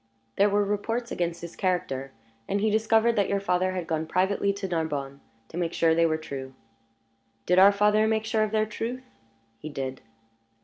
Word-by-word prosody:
"There 205 +1 +4
were 205 0 +2
reports 225 +4 -2
against 170 -1 -2
his 170 - -8
character, 135 -8 -2 0.4
and 200 - 0
he 215 +1 +1
discovered 220 +2 +3
that 200 - +2
your 200 - +1
father 185 -1 0
had 180 -2 -3
gone 160 -1 -2
privately 190 +3 +1
to 200 -1 -5
Narbonne 145 -5 -3 0.3
to 165 - -8
make 170 -1 -1
sure 165 -1 +3
they 165 0 +3
were 155 -1 0
true." 135 -4 -7 0.9
"Did 180 +1 +4
our 195 +2 +8
father 210 +2 +3
make 220 0 0
sure 220 0 0
of 215 - +1
their 215 0 +1
truth?" 230 +4 -5 0.6
"He 155 - -7
did." 135 -2 -5
190 Hz, 185 wpm, -26 LUFS, 160-215 Hz, 0.9 s, our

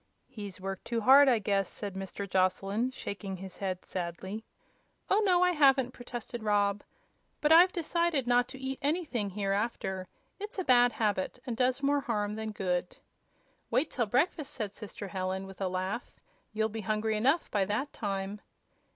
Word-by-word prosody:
"He's 205 -7 -8
worked 195 0 -5
too 235 -1 -1
hard, 270 +4 +8
I 245 - +4
guess," 200 -2 0
said 205 -2 -5
Mr. 195 +1 -5
Joslyn, 195 +5 +1
shaking 200 -6 -5
his 190 0 -9
head 185 -2 -3
sadly. 190 +4 -5 0.7
"Oh, 410 - +5
no; 360 -3 +4
I 360 - +4
haven't," 270 -5 +4
protested 240 -1 -6
Rob; 205 -1 +2 0.6
"but 300 - +2
I've 350 +3 +8
decided 340 -4 0
not 245 0 +3
to 265 - -9
eat 265 0 -4
anything, 285 - -1
hereafter. 195 -1 -2 0.3
It's 415 +1 -6
a 375 - 0
bad 245 -4 +5
habit, 205 -2 0
and 245 -3 -3
does 255 +3 +1
more 285 +1 +3
harm 210 -6 -1
than 220 0 -4
good." 180 -3 -2 0.7
"Wait 300 +5 +1
till 235 -4 0
breakfast," 285 - 0
said 210 -5 -3
sister 205 -1 -7
Helen, 190 0 -2
with 195 0 -11
a 190 - +1
laugh; 185 +6 -3 0.4
"you'll 220 0 +1
be 220 0 -5
hungry 215 +1 0
enough 275 +10 +2
by 205 -2 +2
that 215 +9 -2
time." 200 -1 -3
220 Hz, 170 wpm, -30 LUFS, 195-265 Hz, 0.7 s, hard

